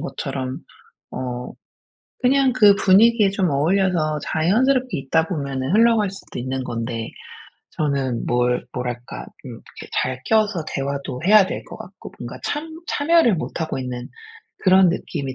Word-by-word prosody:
것처럼 130 -1 -4 0.5
어 125 -1 -5 0.7
그냥 265 +1 +3
그 210 -5 +6
분위기에 210 +2 +5
좀 190 -4 0
어울려서 155 +1 +1
자연스럽게 250 +10 +1
있다 160 +4 +1
보면은 140 -3 -3
흘러갈 225 -3 +4
수도 195 - -10
있는 130 +1 -3
건데 115 -1 -4 0.6
저는 135 -5 -1
뭘 125 0 +1
뭐랄까 125 -1 -5 0.2
음 - - -7
이렇게 - - -12
잘 130 0 -2
껴서 215 -6 +1
대화도 140 -2 -4
해야 210 0 +7
될 - - -5
것 - - -10
같고 - - -11
뭔가 - - -7
참 300 +2 -3 0.2
참여를 295 - +3
못하고 160 -2 -4
있는 125 -1 -5 0.5
그런 190 -1 +6
느낌이 140 -6 -4
160 Hz, 285 characters per minute, -21 LUFS, 130-210 Hz, 0.7 s, 해야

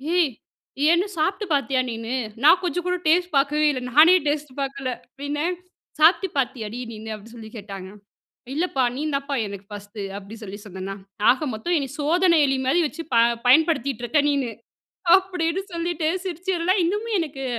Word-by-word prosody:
"ஏய்! 335 -6 +3 0.6
ஏன்னு 345 +3 +4
சாப்பிட்டு 385 +7 0
பார்த்தியா 275 -2 +1
நீனு?" 225 +1 -5 0.3
நான் 330 +5 +7
கொஞ்சம் 355 0 -2
கூட 360 - +1
டேஸ்ட் 350 +2 +3
பார்க்கவே 300 +2 +2
இல்ல. 260 -3 -3
நானே 320 +6 +8
"டேஸ்ட் 295 -1 -1
பார்க்கல" 275 -1 -3 0.2
அப்படின்னேன் 290 +6 -3 0.4
"சாப்பிட்டு 345 +5 +5
பார்த்தியாடி 240 -3 -2
நீன்னு?" 220 0 -7
அப்படின்னு 220 +3 -13
சொல்லி 220 -2 -10
கேட்டாங்க, 195 -2 -8 0.7
"இல்லப்பா 310 -5 0
நீ - - -3
தாம்ப்பா 275 0 -2
எனக்கு 200 -1 -9
ஃபர்ஸ்ட்டு." 205 0 -7
அப்படின்னு 210 +3 -10
சொல்லி 200 +1 -8
சொன்னேனா! 190 0 -6 0.4
"ஆக 280 +4 -1
மொத்தம் 225 +12 -1
என்ன 275 -3 -2
சோதன 335 +3 +3
எலி 270 0 +1
மாதிரி 335 +7 +3
வச்சு 330 +3 -8
அ - - -49
ப - - +6 0.3
பயன்படுத்திட்டு 275 -3 +3
இருக்க 295 +5 +2
நீனு." 275 -5 0 0.7
அப்படின்னு 370 -2 -1
சொல்லீட்டு 335 -2 -1 0.2
சிரிச்சதெல்லாம் 365 +1 0
இன்னமும் 420 +5 -1
எனக்கு 280 -4 -5
290 Hz, 155 wpm, -23 LUFS, 235-340 Hz, 0.7 s, நானே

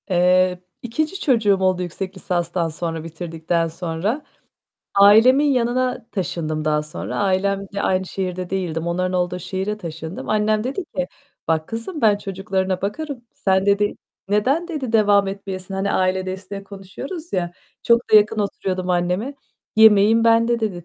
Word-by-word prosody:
Eee, 180 0 +3 0.2
2. 310 +10 -2
çocuğum 220 -7 +3
oldu 185 -1 +2
yüksek 185 +2 -5
lisanstan 175 -2 -1
sonra, 165 0 -4
bitirdikten 165 0 -2
sonra, 170 - -3 0.7
ailemin 220 +8 +7
yanına 250 -1 0
taşındım 155 -4 -2
daha 150 0 +1
sonra. 150 - -6
Ailemle 200 0 0
aynı 190 0 +1
şehirde 185 -1 -4
değildim. 170 -4 -2
Onların 180 +2 -1
olduğu 180 0 0
şehire 190 +4 -3
taşındım. 165 -2 -7
Annem 215 0 +1
dedi 280 +9 -3
ki: 180 -1 0 0.4
"Bak 160 -1 0
kızım, 230 +9 -5
ben 215 -4 +4
çocuklarına 190 -1 -2
bakarım, 265 +4 -4
sen" 190 0 +1
dedi, 205 +1 +2 0.3
"neden" 265 - +1
dedi, 280 -9 -4
"devam 205 -3 +4
etmeyesin?" 195 -1 -6
Hani, 195 +1 -1
aile 185 0 +1
desteği 190 +1 -6
konuşuyoruz 205 - -8
ya. 175 -2 -1 0.3
Çok 235 0 +2
da - - +10
yakın 215 +1 +4
oturuyordum 185 -2 -2
anneme. 180 +9 0 0.4
"Yemeğin 220 +1 +6
bende." 230 +1 +3
dedi, 190 -6 -3
195 Hz, 140 wpm, -21 LUFS, 180-220 Hz, 0.7 s, da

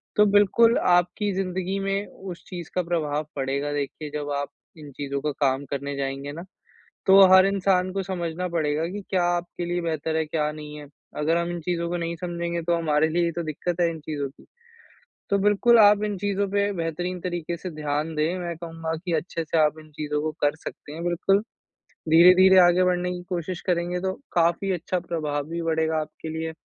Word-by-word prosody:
तो 210 - +6
बिल्कुल 205 +3 +4
आपकी 180 +4 +2
ज़िंदगी 190 0 -2
में 195 +1 -1 0.3
उस 175 - -10
चीज़ 175 -3 -7
का 180 - +2
प्रभाव 155 -3 -1
पड़ेगा। 140 +2 -2
देखिए 145 +1 -4
जब 145 -1 -3
आप 145 - -3 0.3
इन 150 -2 -11
चीज़ों 140 -1 -3
का 150 - -1
काम 140 -1 0
करने 140 0 -3
जाएँगे 135 +1 -3
ना, 165 +4 -7 0.6
तो 195 +1 +8
हर 190 0 +8
इंसान 185 -1 +1
को 195 0 -1
समझना 180 -1 -3
पड़ेगा 155 -1 0
कि 205 +2 -5
क्या 185 -2 +1
आपके 175 0 -2
लिए 175 +1 -1
बेहतर 160 -1 -2
है, 160 0 +1
क्या 150 -1 -1
नहीं 150 -1 -9
है? 145 - -10 0.3
अगर 160 +3 +1
हम 170 0 -1
इन 175 - -4
चीज़ों 170 0 -2
को 175 - -1
नहीं 170 0 -3
समझेंगे, 170 -1 -3
तो 170 +1 +1
हमारे 155 -1 +2
लिए 175 +2 +1
ही 170 - 0
तो 170 +1 -4
दिक्कत 170 +3 -3
है 170 - +3
इन 160 - -7
चीज़ों 145 -2 -4
की। 135 - -20 0.9
तो 200 - +3
बिल्कुल 210 +4 +4
आप 205 -1 +6
इन 210 -1 -2
चीज़ों 200 +1 0
पे 200 0 +1
बेहतरीन 175 +1 -3
तरीके 175 -1 -3
से 180 +1 -6
ध्यान 150 +1 -3
दें। 155 +4 0
मैं 170 -2 -4
कहूँगा 165 -1 -5
कि 175 - -2
अच्छे 165 +1 -2
से 160 +1 0
आप 155 0 +3
इन 155 0 -16
चीज़ों 150 0 -2
को 155 0 -2
कर 145 0 +2
सकते 145 - -8
हैं, 165 +2 -6
बिल्कुल। 175 +3 +2 0.7
धीरे-धीरे 180 +3 +7
आगे 175 +1 +5
बढ़ने 180 0 +1
की 180 0 -6
कोशिश 175 0 -3
करेंगे 175 0 0
तो, 190 +1 -1 0.2
काफ़ी 175 +3 +2
अच्छा 180 +1 -2
प्रभाव 150 -4 -3
भी 170 0 -4
बढ़ेगा, 160 -1 0
आपके 155 +1 -7
लिए। 160 0 -3
170 Hz, 205 wpm, -25 LUFS, 155-180 Hz, 0.9 s, तो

